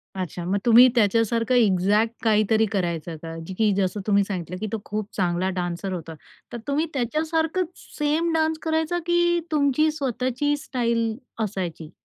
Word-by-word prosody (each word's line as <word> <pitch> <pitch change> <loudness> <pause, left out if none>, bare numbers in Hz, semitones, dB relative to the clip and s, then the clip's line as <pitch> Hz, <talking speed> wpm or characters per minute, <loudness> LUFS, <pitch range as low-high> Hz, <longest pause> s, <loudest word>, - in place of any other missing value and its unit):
अच्छा. 180 -2 -4
मग 190 +3 0
तुम्ही 240 +2 +8
त्याच्यासारखं 230 +2 +2
एक्झॅक्ट 210 0 +3
काहीतरी 220 0 +3
करायचं 170 -4 -2
का? 165 0 -7 0.2
की 220 -2 +3
जसं 195 +1 0
तुम्ही 200 -1 +4
सांगितलं 180 -3 -5
की 215 - -3
तो 225 - -2
खूप 210 0 -3
चांगला 180 0 0
डान्सर 175 +2 -3
होता. 165 -2 -6 0.4
तर - - -3
तुम्ही 290 +3 +1
त्याच्यासारखंच 320 +6 0 0.3
सेम 310 +3 +1
डान्स 320 0 +1
करायचा 320 +2 0
की 345 0 +2
तुमची 300 0 +3
स्वतःची 270 0 -1
स्टाईल 235 -6 -1 0.3
असायची? 175 -6 -4
225 Hz, 145 wpm, -24 LUFS, 190-295 Hz, 0.4 s, तुम्ही